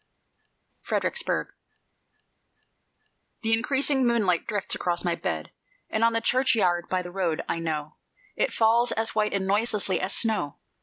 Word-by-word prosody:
FREDERICKSBURG 480 - 0 1.9
The 225 0 +2
increasing 265 +3 +2
moonlight 205 -8 +1
drifts 205 -3 -1
across 175 0 -1
my 175 - +2
bed, 80 - -4 0.4
And 220 - 0
on 230 0 +4
the 230 - +1
churchyard 220 -9 +2
by 185 -1 0
the 175 - -8
road, 175 -4 -1
I 165 - -1
know 155 -2 -4 0.4
It - - +1
falls 230 +2 +3
as 225 0 -1
white 215 -1 +1
and 195 -1 0
noiselessly 205 -1 +1
as 190 +1 -1
snow.... 215 -11 0
210 Hz, 140 wpm, -26 LUFS, 175-230 Hz, 1.9 s, on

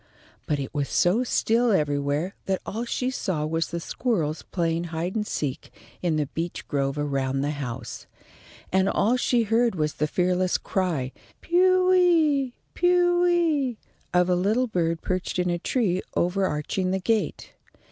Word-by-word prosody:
But 150 - +1
it 135 -2 -5
was 145 -2 -1
so 195 +8 +3
still 235 0 +2
everywhere 145 +1 0
that 190 -1 0
all 230 +4 -3
she 255 +2 -1
saw 170 -11 -2
was 165 +1 -1
the 170 - -4
squirrels 165 - -1
playing 170 -1 -1
hide 170 +3 -3
and 210 -1 -1
seek 135 -3 -3 0.3
in 170 -3 +1
the 150 -1 +1
beech 165 +4 -5
grove 140 -1 -1
around 135 -2 -1
the 145 +1 0
house, 130 -5 -6 0.6
and 190 +1 +3
all 230 +4 +2
she 245 -1 +2
heard 225 +1 +2
was 150 -2 -1
the 150 - -1
fearless 180 +2 +1
cry, 165 -9 -1 0.3
"Pewee! 355 -6 +4 0.2
pewee!" 350 -7 +2 0.3
of 180 0 +3
a 180 - +3
little 210 +8 +2
bird 170 -7 -1
perched 185 0 -2
in 180 -1 +1
a 175 - -1
tree 190 -3 0
overarching 185 0 0
the 190 +1 0
gate. 210 -3 -1
185 Hz, 150 wpm, -25 LUFS, 155-240 Hz, 0.6 s, Pewee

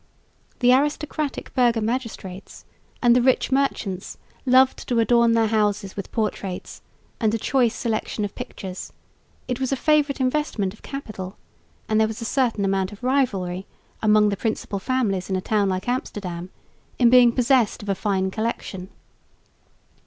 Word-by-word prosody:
The 250 0 +6
aristocratic 295 +1 -1
burgher 240 -3 +3
magistrates 220 -5 -5 0.4
and 240 -1 +6
the 250 - +4
rich 260 +2 +2
merchants 225 -9 -1 0.3
loved 255 +1 +4
to 245 - 0
adorn 235 0 +4
their 225 -1 +3
houses 210 -2 0
with 200 - -6
portraits 205 -4 -3 0.4
and 220 -3 +2
a - - 0
choice 245 0 +1
selection 215 -2 -2
of 200 - -6
pictures; 185 -1 -7 0.6
it 250 0 -2
was 260 0 -1
a - - +2
favourite 295 0 +2
investment 255 -8 0
of 215 - -18
capital, 215 -9 -7 0.5
and 215 0 +2
there 220 - +4
was 220 +2 -6
a 230 - -5
certain 230 -5 +1
amount 195 0 0
of 205 +3 -13
rivalry 195 -9 0 0.3
among 210 -1 +4
the 200 - -2
principal 215 -1 -2
families 200 -5 -1
in 190 - 0
a - - 0
town 205 +1 +1
like 185 +2 -3
Amsterdam 185 -8 -3 0.5
in 240 -2 +5
being 250 -1 +7
possessed 245 -3 +2
of 205 - -7
a - - +3
fine 190 -1 -1
collection. 200 -4 -4
225 Hz, 155 wpm, -23 LUFS, 195-255 Hz, 0.6 s, being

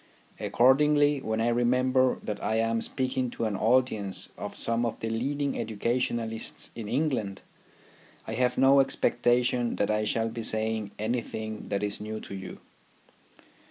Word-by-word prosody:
Accordingly, 145 +2 +4
when 110 -3 -2
I 115 +1 +2
remember 125 +2 +2
that 105 -1 -4
I 110 - 0
am 115 0 +1
speaking 130 -1 -1
to 115 - -3
an 105 -2 -1
audience 110 -3 +1
of - - -6
some 115 +1 0
of 115 - -2
the 115 - -3
leading 140 +5 -1
educationists 115 0 -2
in 110 -3 -6
England, 125 -9 -1 0.8
I 110 - -5
have 125 +1 +1
no 135 +1 +6
expectation 125 -2 +2
that 100 - 0
I 105 0 +1
shall 115 +1 +1
be 115 +1 -5
saying 110 -1 -1
anything 110 -1 -3
that 100 0 -2
is 105 0 -2
new 110 +1 -5
to - - -9
you. 95 -1 -8
115 Hz, 150 wpm, -28 LUFS, 110-130 Hz, 0.8 s, no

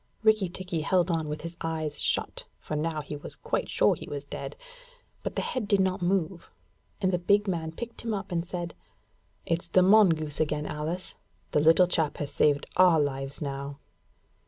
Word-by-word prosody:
Rikki 215 -4 +4
tikki 180 -2 -3
held 180 +2 +2
on 160 -2 -1
with 150 0 -4
his 170 +1 -6
eyes 160 -2 -3
shut, - - +1
for 155 - -5
now 155 0 -1
he 150 - -6
was 145 - -8
quite - - -2
sure - - +4
he - - -8
was 145 -1 -5
dead; - - -6 0.7
but - - -4
the - - 0
head 255 -5 -2
did 200 -2 +3
not 190 0 +1
move, 175 -1 -1 0.5
and 190 -2 +1
the 180 - +2
big 200 +4 +3
man 165 -4 -2
picked 235 +7 -7
him 230 - -3
up 200 -2 -4
and 170 -1 0
said: 175 -1 -5 0.7
'It's 170 +1 -1
the 185 +2 +4
mongoose 175 -7 +4
again, 150 -1 0
Alice; 160 +5 -4 0.4
the - - +3
little 165 +4 +6
chap 165 -4 0
has 145 - -4
saved 145 -1 +3
our 180 -3 +6
lives 135 -1 -2
now.' 140 0 -4
165 Hz, 185 wpm, -28 LUFS, 150-185 Hz, 0.7 s, little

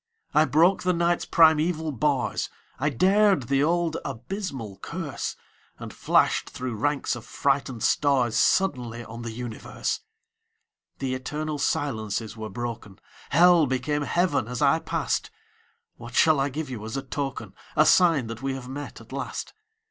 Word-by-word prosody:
I 155 +1 +5
broke 170 +6 +3
the 180 0 +1
Night's 170 0 +1
primeval 160 0 +3
bars, 135 -1 0 0.3
I 145 +3 +1
dared 190 - +3
the 135 +3 +1
old 170 0 +1
abysmal 120 - -5
curse, - - -5 0.4
And - - -8
flashed - - +2
through 125 -1 -5
ranks 140 +5 0
of 120 - -8
frightened 135 -4 -1
stars 130 -6 +2
Suddenly 120 -6 +1
on 115 +1 -8
the 120 - -5
universe! 115 0 -4 1.0
The 130 -2 -2
eternal 150 +3 -4
silences 110 -7 -2
were 110 -1 -6
broken; 115 -5 -6 0.3
Hell 170 0 +6
became 130 +3 -1
Heaven 145 -5 +1
as 125 0 -4
I - - +4
passed. - - -2 0.7
What 120 0 -10
shall 155 -3 +5
I 135 +1 +1
give 145 0 -5
you 110 -4 -6
as 110 +4 -4
a 135 - -3
token, 135 -7 -4 0.2
A 155 - +5
sign 160 -4 +5
that 115 +1 -7
we 135 0 -2
have 130 -2 -8
met, 145 +3 -7
at - - -16
last? - - -5
140 Hz, 150 wpm, -26 LUFS, 120-155 Hz, 1.0 s, Hell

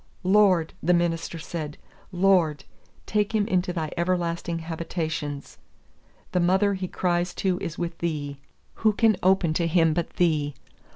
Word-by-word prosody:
"Lord," 185 -4 +4
the 175 +2 +3
minister 170 -1 -1
said, 155 -2 -6 0.3
"Lord, 175 -6 +2 0.4
take 210 +1 0
him 210 -1 +2
into 185 -4 +1
Thy 160 -3 -3
everlasting 170 -1 -1
habitations. 160 -3 -4 0.7
The 180 - +1
mother 190 +3 +3
he 190 -1 -3
cries 175 0 -1
to 185 -2 0
is 165 -4 -5
with 170 -1 -4
Thee. 145 -4 -3 0.4
Who 215 -1 +4
can 220 0 +3
open 185 -3 +3
to 170 +1 0
him 165 -1 +3
but 170 +1 -1
Thee? 150 -5 +1
175 Hz, 140 wpm, -25 LUFS, 160-185 Hz, 0.7 s, Lord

